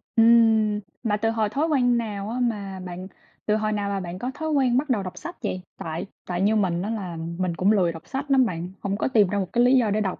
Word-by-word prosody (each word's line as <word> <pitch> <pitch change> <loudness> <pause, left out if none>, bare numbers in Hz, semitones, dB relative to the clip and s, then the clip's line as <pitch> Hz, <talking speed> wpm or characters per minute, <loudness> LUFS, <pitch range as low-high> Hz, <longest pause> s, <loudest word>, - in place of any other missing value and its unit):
Ừm. 225 -2 +5 0.2
Mà 210 -2 +1
từ 225 +1 0
hồi 220 -2 0
thói 290 +7 0
quen 245 -6 +3
nào 210 -3 -3
á 245 +2 -3
mà 200 -6 -2
bạn 180 +1 -7 0.4
từ 210 - +2
hồi 215 0 0
nào 205 -1 -1
mà 200 - -1
bạn 180 0 -6
có 250 - -3
thói 315 +3 -4
quen 260 -4 +3
bắt 285 +1 0
đầu 210 -6 +1
đọc 185 - -7
sách 345 - -8
vậy? 185 -3 -2 0.2
Tại 160 +2 -4 0.2
tại 180 0 -2
như 210 +3 +3
mình 180 -5 +1
á 200 - -3
là 190 -7 -4 0.2
mình 180 -2 -1
cũng 195 +4 +3
lười 185 -5 +3
đọc 165 -1 -11
sách 275 +1 -4
lắm 260 -2 +5
bạn, 175 -3 -4
không 200 0 -2
có - - 0
tìm 220 -6 +4
ra 200 +2 -1
một 190 -2 -4
cái 240 - +4
lý 250 +2 +5
do 225 -5 +2
để 215 +1 +1
đọc 190 -3 -2
210 Hz, 270 wpm, -24 LUFS, 190-240 Hz, 0.4 s, Ừm